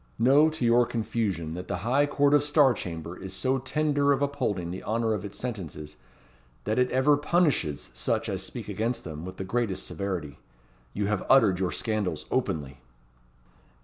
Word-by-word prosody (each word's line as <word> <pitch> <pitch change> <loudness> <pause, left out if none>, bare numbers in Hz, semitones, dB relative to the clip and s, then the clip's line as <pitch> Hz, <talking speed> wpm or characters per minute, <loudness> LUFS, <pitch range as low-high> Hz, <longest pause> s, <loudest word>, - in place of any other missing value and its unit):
"Know, 140 +7 +5
to 155 -6 -3
your 120 +1 +4
confusion, 105 -8 -2
that 90 +2 -6
the - - -2
High 140 +5 +3
Court 145 0 +2
of 145 -1 +5
Star 145 -3 +4
Chamber 85 -4 -6
is 95 0 -7
so 130 +4 0
tender 145 +1 +1
of 140 0 +2
upholding 120 -12 -2
the 95 - -6
honour 115 0 0
of 100 -3 -3
its 100 - -7
sentences, 80 -11 -6 0.7
that 110 +3 0
it 125 0 +3
ever 130 +3 +4
punishes 145 - 0
such - - -1
as - - -2
speak - - -6
against 115 +3 -2
them 80 0 -7
with 95 0 -8
the - - -4
greatest 100 -1 -2
severity. 90 -8 -4 0.6
You 105 - 0
have 105 -1 -1
uttered 110 -9 +5
your 95 -2 0
scandals 105 -8 -2
openly." 70 -3 -2
110 Hz, 175 wpm, -27 LUFS, 90-135 Hz, 0.7 s, Know